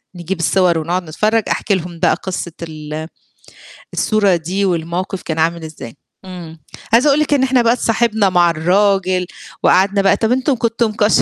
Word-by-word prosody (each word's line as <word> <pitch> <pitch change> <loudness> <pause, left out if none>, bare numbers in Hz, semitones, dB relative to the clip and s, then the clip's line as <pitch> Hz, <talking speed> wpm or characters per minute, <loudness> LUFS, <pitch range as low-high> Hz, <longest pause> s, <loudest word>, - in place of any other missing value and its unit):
نجيب 175 +1 -5
الصور 175 0 +2
ونقعد 175 +4 -2
نتفرّج، 215 +8 0
أحكي 205 - 0
لهم 175 -2 -6
بقى 175 - +3
قصّة 180 -2 -5
ال 155 -1 -7 0.9
الصورة 205 -4 +2
دي 180 +4 -2
والموقف 180 +2 -2
كان 160 -1 -4
عامل 165 +1 0
إزاي، 155 -7 -9 0.3
امم، 170 -3 -10 0.3
عايزة 240 +6 +5
أقول 285 +1 +3
لِك 305 -1 +1
إن 275 -2 +2
إحنا 260 -1 +3
بقى 235 0 +3
اتصاحبنا 225 -4 +1
مع 175 -1 +3
الراجل 185 +2 +1 0.4
وقعدنا 195 +2 +3
بقى 195 - +3
طَب 220 0 0
أنتم 260 +2 +1
كنتم 230 -1 0
مكش 210 0 +2
185 Hz, 165 wpm, -17 LUFS, 170-220 Hz, 0.9 s, عايزة